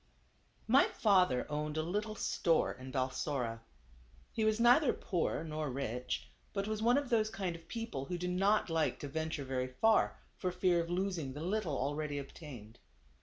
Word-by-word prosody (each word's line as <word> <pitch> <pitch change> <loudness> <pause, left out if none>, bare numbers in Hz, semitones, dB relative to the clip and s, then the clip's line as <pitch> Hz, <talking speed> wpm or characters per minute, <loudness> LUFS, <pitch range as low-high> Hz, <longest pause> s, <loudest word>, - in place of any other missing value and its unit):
Y 260 +5 +6
father 185 - +3
owned 150 +1 -3
a 155 - +1
little 210 +6 -2
store 165 -5 +1
in 130 +1 -9
Balsora. 130 -3 -1 0.7
He 225 - -1
was 215 0 +2
neither 245 +5 +6
poor, 175 -4 -1
nor 155 -2 -3
rich; 125 -2 -3 0.3
but 195 0 -1
was 215 0 -2
one 240 +4 +4
of 285 -3 -2
those 215 -2 +3
kind 190 -5 -3
of 165 0 -13
people 225 - -4
who 180 +4 -3
do 180 +1 -3
not 195 +4 +2
like 165 -2 +1
to 145 - -4
venture 160 0 -3
very 130 -1 -1
far, 220 +13 +3 0.2
for 185 - -2
fear 180 -1 +2
of 170 - -5
losing 175 -6 -1
the 145 +3 -6
little 185 -6 -1
already 145 +2 -2
obtained. 135 -6 -9
165 Hz, 170 wpm, -34 LUFS, 140-210 Hz, 0.7 s, Y